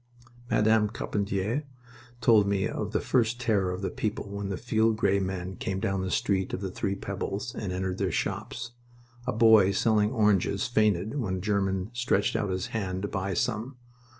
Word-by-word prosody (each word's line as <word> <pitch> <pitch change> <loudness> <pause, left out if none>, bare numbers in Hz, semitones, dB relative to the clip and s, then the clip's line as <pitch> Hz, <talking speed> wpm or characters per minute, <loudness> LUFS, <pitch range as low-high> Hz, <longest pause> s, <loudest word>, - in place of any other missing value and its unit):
Madame 110 0 +3
Carpentier 100 +7 -2 0.6
told 110 -3 +5
me 100 -1 +1
of - - -4
the - - +1
first 120 -1 +1
terror 105 -7 +1
of 90 +2 -4
the - - -1
people 105 -1 -3
when 100 -1 -4
the 95 - -2
field 110 -1 +1
gray 100 -3 +2
men 95 -1 -3
came 95 0 -3
down 95 -1 -1
the 95 - -2
Street 95 0 0
of - - -3
the 95 -2 -3
Three 95 +1 -2
Pebbles 100 +4 -4
and 100 -4 -4
entered 95 0 -2
their 95 -3 0
shops. 120 +7 -3 0.6
A - - +2
boy 110 -4 +6
selling 105 +1 +2
oranges 105 -3 +2
fainted 110 +1 +1
when 95 -7 -1
a - - -3
German 95 0 -1
stretched 120 -4 +1
out 110 -3 0
his 95 0 -2
hand 95 -4 -2
to - - 0
buy 95 -2 -2
some. 120 +6 -2
100 Hz, 180 wpm, -28 LUFS, 95-110 Hz, 0.6 s, boy